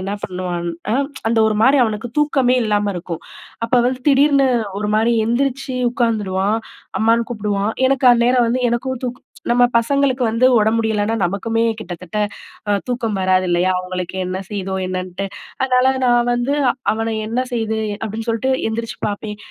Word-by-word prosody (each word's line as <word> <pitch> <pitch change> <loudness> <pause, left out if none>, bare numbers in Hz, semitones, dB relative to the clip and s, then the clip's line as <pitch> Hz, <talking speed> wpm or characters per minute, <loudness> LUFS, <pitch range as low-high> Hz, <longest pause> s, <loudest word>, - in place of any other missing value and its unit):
என்னா 195 +2 -3
பண்ணுவான்னா, 180 +2 -3 0.3
அந்த 225 0 +1
ஒரு 215 - -1
மாரி 270 +4 +5
அவனுக்கு 220 +1 -3
தூக்கமே 265 -4 +2
இல்லாம 205 -1 +1
இருக்கும். 170 -1 -6 0.4
அப்ப 230 - -21
வந்து 255 0 -2
திடீர்னு 275 -1 +4 0.3
ஒரு 210 - -1
மாரி 230 +2 +2
எந்திரிச்சு 260 +2 -1 0.2
உட்காந்துருவான். 210 -4 0 0.4
அம்மான்னு 230 +1 +2
கூப்பிடுவான். 210 -1 -1 0.2
எனக்கு 270 -1 +3
அந்நேரம் 240 +1 +3
வந்து 250 +2 0
எனக்கும் 255 +1 -2
தூக் 245 0 -5 0.3
நம்ம 245 +1 +5
பசங்களுக்கு 265 +2 +1
வந்து 230 +3 +3
உடம்பு 220 +1 +2
முடியலைன்னா 220 -1 0
நமக்குமே 225 +6 0 0.2
கிட்டத்தட்ட 180 0 -6 0.5
அ - - +4
தூக்கம் 240 -4 -2
வராது 185 0 +2
இல்லையா? 175 +1 +2
அவங்களுக்கு 180 0 -5
என்ன 185 +1 -3
செய்யுதோ? 195 -2 -4
என்னன்ட்டு. 185 +1 -4 0.4
அதனால 255 0 +3 0.2
நா 245 - +4 0.2
வந்து, 245 +4 0 0.4
"அவன 225 +1 -2
என்ன 230 +3 -1
செய்யுது?" 220 -2 -1 0.2
அப்படீன்னு 220 +1 -4
சொல்ட்டு 230 +4 0 0.2
எந்திரிச்சு 230 +1 -4
பார்ப்பேன். 210 0 -4
225 Hz, 150 wpm, -19 LUFS, 200-245 Hz, 0.5 s, மாரி